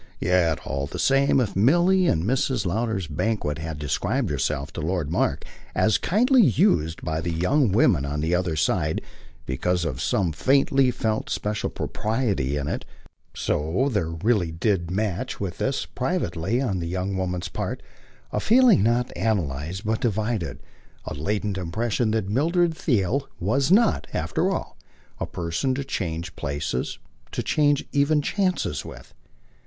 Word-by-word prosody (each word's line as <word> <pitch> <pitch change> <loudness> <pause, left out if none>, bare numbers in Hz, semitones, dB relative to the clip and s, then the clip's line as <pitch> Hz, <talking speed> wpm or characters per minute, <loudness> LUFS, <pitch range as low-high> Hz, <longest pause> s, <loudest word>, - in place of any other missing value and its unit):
Yet, 90 -3 +2
all 70 +1 -2
the - - -7
same, 135 0 +3
if 120 -6 -1
Milly, 175 - +4
at - - +3
Mrs. 125 - 0
Lowder's 105 0 -1
banquet, 80 -1 -2
had 80 -1 -5
described 100 - -1
herself 70 0 -2
to - - -4
Lord 80 -2 -1
Mark - - 0 0.3
as 110 - +3
kindly 250 +7 +4
used 85 - +2
by 80 -1 -2
the 85 +1 -2
young 100 - +2
woman 90 - +4
on 70 +1 -3
the 80 +3 0
other 90 -2 0
side 75 +1 0 0.4
because 90 +7 0
of 65 -5 -3
some 95 -5 +1
faintly 135 - +3
felt 110 -3 -1
special 105 0 -2
propriety 105 - -1
in 70 0 -3
it, - - -3 0.5
so 85 - 0
there 100 -8 0
really 90 +1 0
did 85 0 0
match 105 +5 -2
with 95 -4 -4
this, - - -1
privately, 90 +8 -1
on 110 -9 -1
the 85 - -3
young 95 +2 -2
woman's 90 -1 -2
part, - - -4 0.5
a - - 0
feeling 245 - +5
not 120 +3 +1
analysed 90 - -2
but 110 +1 0
divided, 105 - -1 0.4
a - - -4
latent 100 +6 -2
impression 110 +6 -1
that 110 -3 0
Mildred 165 - +2
Theale 130 - 0
was 130 - +1
not, 220 +3 +4
after - - 0
all, - - -4 0.4
a - - -2
person 90 +10 -2
to 140 - -2
change 85 -8 -4
places, 70 -3 -3 0.4
to - - -2
change 145 -2 +2
even 145 +1 +2
chances 190 0 0
with. - - -11
100 Hz, 150 wpm, -24 LUFS, 80-125 Hz, 0.5 s, feeling